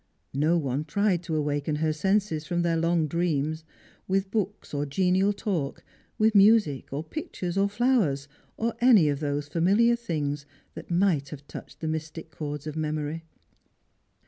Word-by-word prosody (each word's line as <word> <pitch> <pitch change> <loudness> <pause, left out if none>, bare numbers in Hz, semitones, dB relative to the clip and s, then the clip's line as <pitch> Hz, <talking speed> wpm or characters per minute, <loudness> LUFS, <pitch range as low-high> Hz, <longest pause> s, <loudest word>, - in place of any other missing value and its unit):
No 155 +5 +2
(sne 140 -1 -1
tried 200 +1 +1
to 165 -2 -3
awaken 150 0 -1
her 155 +1 0
senses 190 -1 0
from 175 -1 0
their 170 -1 +1
long 165 0 +2
dream 160 -2 0 0.5
with 190 0 0
books 205 -4 -3
or 145 0 0
genial 185 +6 +2
talk, 190 -9 -3 0.3
with 220 0 +3
music, 200 - +4
or 140 +3 -3
pictures, 180 - -5
or 200 +1 +2
flowers, 205 - +1 0.3
or 230 +1 -1
any 220 -11 +6
of 140 -1 -1
those 145 -1 -2
familiar 200 +10 +3
things 150 -10 -3 0.3
that - - -10
might 170 -6 +2
have 145 -1 -9
touched - - -10
the 160 - -2
mystic 160 +1 -5
chords 145 0 -5
of 155 -1 -5
memory. 155 +1 -3
165 Hz, 155 wpm, -27 LUFS, 150-195 Hz, 0.5 s, any